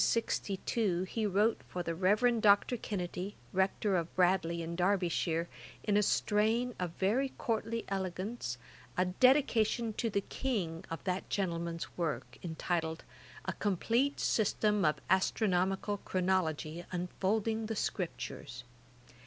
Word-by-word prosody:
53. 225 -3 +1
In - - -9 0.4
1762 - - 0
he 225 -2 0
wrote 205 +4 +2
for 180 - -3
the 165 - -2
Reverend 215 +7 +3
Dr. 205 +4 +5
Kennedy, 195 -3 -4 0.2
Rector 190 +1 +1
of 170 -2 -2
Bradley 175 -2 +2
in 165 +1 -4
Derbyshire, 175 -2 +1 0.4
in 210 - +1
a 210 - +5
strain 220 +4 +2
of 180 -1 -1
very 230 +10 +1
courtly 230 0 -1
elegance, 190 - -3 0.4
a 180 - +3
Dedication 235 +1 +3
to 230 +2 -1
the 200 -1 0
King[*] 185 -11 -2
of 165 -2 -5
that 185 0 -2
gentleman's 170 -3 -2
work, 130 -7 -3
entitled, 160 -1 -2 0.4
A - - -1
complete 230 +8 +1
System 210 -2 +2
of 150 - +4
Astronomical 190 +1 +1
Chronology, 175 -4 -1
unfolding 210 +5 -1
the 225 - -2
Scriptures. 165 -10 -4
190 Hz, 130 wpm, -33 LUFS, 175-220 Hz, 0.4 s, Dr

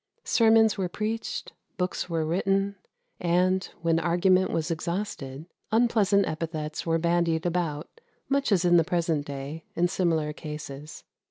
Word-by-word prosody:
Sermons 225 -2 +4
were 185 -2 0
preached; 215 +4 -4 0.2
books 180 0 -2
were 165 -2 0
written; 195 +4 +1 0.4
and, 180 +2 +2 0.2
when 165 -1 +3
argument 185 +2 +3
was 165 +1 -1
exhausted, 165 -5 -4 0.3
unpleasant 215 -4 +3
epithets 155 -1 -4
were 165 0 +3
bandied 170 -1 +1
about, 170 - -2 0.3
much 275 -4 +1
as 185 -3 +3
in 175 0 +6
the 165 - +5
present 165 -4 0
day, 140 +3 -6
in 175 +1 +3
similar 165 -4 0
cases. 150 -1 -8
175 Hz, 135 wpm, -27 LUFS, 160-195 Hz, 0.4 s, in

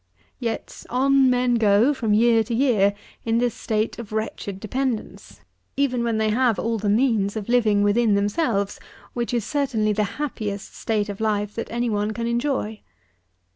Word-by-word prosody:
92. - - -5
Yet, - - -7
on 270 +1 +3
men 250 0 +2
go, 215 +6 +4
from 230 -6 -2
year 225 0 +4
to 230 - -2
year, 220 -6 +3 0.3
in 225 0 +1
this 240 -1 +1
state 220 +1 -2
of 225 -3 -8
wretched 215 -3 -4
dependence, 245 +2 -4 0.4
even 255 -4 +1
when 230 -2 0
they 220 0 +1
have 240 -1 +2
all 230 -1 -1
the 205 0 -1
means 215 -3 +2
of 215 -2 -4
living 220 -4 +3
within 210 +1 +3
themselves, 200 0 0 0.3
which 240 -1 -2
is 235 -4 -1
certainly 245 -8 0
the 210 0 +1
happiest 215 -9 -4
state 215 -2 -1
of 205 0 -6
life 210 -1 0
that 230 - -5
any 240 +1 -1
one 210 -1 -1
can 230 +1 -3
enjoy. 235 -3 -1
225 Hz, 175 wpm, -23 LUFS, 210-245 Hz, 0.4 s, go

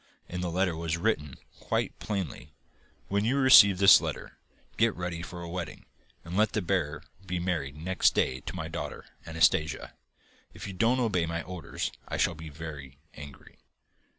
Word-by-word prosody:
In 90 0 -5
the 90 - -2
letter 90 0 0
was 80 0 -2
written, 85 -7 -1 0.2
quite - - -2
plainly: 90 -7 -5 0.5
'When 100 +1 0
you 125 +5 +1
receive 120 -8 +8
this 100 0 +8
letter, - - -6 0.4
get 115 0 +2
ready 90 -1 -4
for 85 0 -8
a - - -6
wedding, 85 0 -6 0.4
and 85 +2 -6
let 110 +1 +2
the 105 - 0
bearer 85 -5 -1 0.2
be 90 -1 -3
married 85 -6 -2
next 90 +4 +1
day 65 - +1
to - - -4
my - - -4
daughter, - - -6 0.2
Anastasia. 80 0 +1 0.6
If - - -8
you 100 - -6
don't 115 +7 +2
obey 95 -9 +1
my 85 0 -3
orders 90 -5 -5 0.2
I - - -3
shall 85 - +2
be 80 0 -9
very 75 -3 -9 0.2
angry. 75 -2 -12
85 Hz, 170 wpm, -28 LUFS, 80-95 Hz, 0.6 s, receive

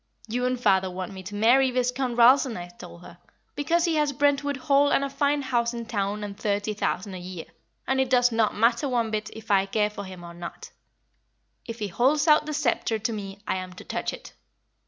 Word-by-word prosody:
'You 245 +3 -1
and 255 -1 -1
father 190 -5 +3
want 185 0 -6
me 190 - -8
to 195 +3 -8
marry 245 +5 +4
Viscount 250 0 -1
Ralston,' 250 -1 +5
I 175 0 -7
told 175 0 -12
her, 175 0 -13 0.4
'because 335 +4 +1
he 330 -2 +1
has 300 -1 +2
Brentwood 285 0 +1
Hall 280 +2 +3
and 275 - +3
a 275 - -3
fine 285 +1 +1
house 240 -2 0
in 235 -1 -5
town 210 -2 -2
and 200 -1 -6
thirty 205 +1 -1
thousand 200 -1 -2
a 185 - -6
year, 180 -2 -7 0.4
and 265 +1 +1
it 260 - -1
does 245 -1 +4
not 225 -1 +1
matter 235 +5 +2
one 235 -3 0
bit 215 0 -2
if 220 0 -8
I 195 -1 +3
care 210 +1 0
for 205 -1 -7
him 185 -2 -10
or 170 0 -9
not; 170 0 -9 1.0
if 230 -1 -6
he 210 -3 -3
holds 275 - +2
out 300 -1 +5
the 305 - -3
sceptre 235 -5 0
to 215 +2 -2
me 200 -1 -7
I - - 0
am 185 0 -6
to 180 - -11
touch - - -3
it.' - - -11
230 Hz, 220 wpm, -26 LUFS, 195-265 Hz, 1.0 s, Ralston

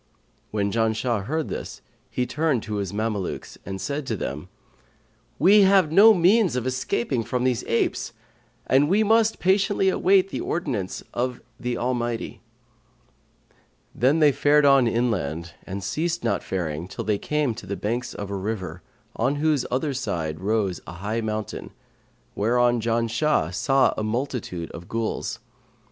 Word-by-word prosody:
When 100 -1 -1
Janshah 110 -1 0
heard 155 +5 -2
this, - - -6 0.3
he 125 - -1
turned 150 -4 0
to 105 -1 -4
his 100 -3 -3
Mamelukes 105 -2 -3
and 95 0 -4
said 140 +5 -3
to 110 - -1
them, 75 +2 -5 0.9
'We 200 +8 +6
have 190 -5 +5
no 210 +6 +8
means 185 - +4
of 125 -1 -2
escaping 130 -1 -1
from 125 +3 -2
these 125 -1 +1
apes, 115 - 0 0.5
and 140 +3 +3
we 205 +4 +4
must 220 +1 +3
patiently 195 +1 +2
await 190 0 +3
the - - -4
ordinance 130 - -3
of 125 0 -2 0.2
the 125 -1 -2
Almighty.' 120 -2 -2 1.5
Then 135 +6 +3
they 150 -2 +5
fared 145 +2 +3
on 135 -3 +6
inland 85 - -1
and 95 +1 -5
ceased 165 - -2
not - - 0
faring 85 -3 -3
till 95 - -6
they 105 -2 0
came 150 -5 0
to 105 -3 -10
the 100 - -3
banks 120 +5 -3
of 100 -1 -6
a - - -2
river, 95 -4 -4 0.3
on 140 - +1
whose 150 -2 +1
other 135 +3 -1
side 80 -12 -3
rose 100 -2 -1
a - - -7
high 105 +6 -3
mountain, 110 -1 -4 0.6
whereon 120 +2 +2
Janshah 115 - +1
saw 135 +7 +3
a 110 - -3
multitude 110 -7 -3
of 85 +1 -10
Ghuls. 115 -1 -3
120 Hz, 150 wpm, -24 LUFS, 100-150 Hz, 1.5 s, no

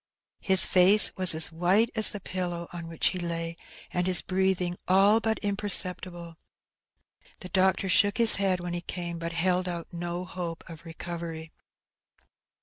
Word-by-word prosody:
His 190 -1 +4
face 190 +3 +4
was 185 -4 +2
as 160 +2 0
white 185 +8 +1
as 220 -2 +5
the 205 - -6
pillow 175 -2 -5
on 170 -1 -7
which 165 -1 +1
he 185 - -5
lay, 165 -1 -4 0.4
and 180 0 -1
his 180 -5 +3
breathing 185 -2 -1
all 195 +4 +4
but 220 -1 -1
imperceptible. 185 -4 0 1.0
The 185 - -9
doctor 190 0 +1
shook 205 +2 +2
his 230 -1 +4
head 190 -2 0
when 175 0 -5
he 175 - -4
came, 175 -1 -6
but 170 0 -4
held 180 +1 0
out 170 -1 -7
no 175 +1 -5
hope 175 -2 -7
of 165 0 -12
recovery. 165 -1 -8
180 Hz, 155 wpm, -27 LUFS, 170-190 Hz, 1.0 s, as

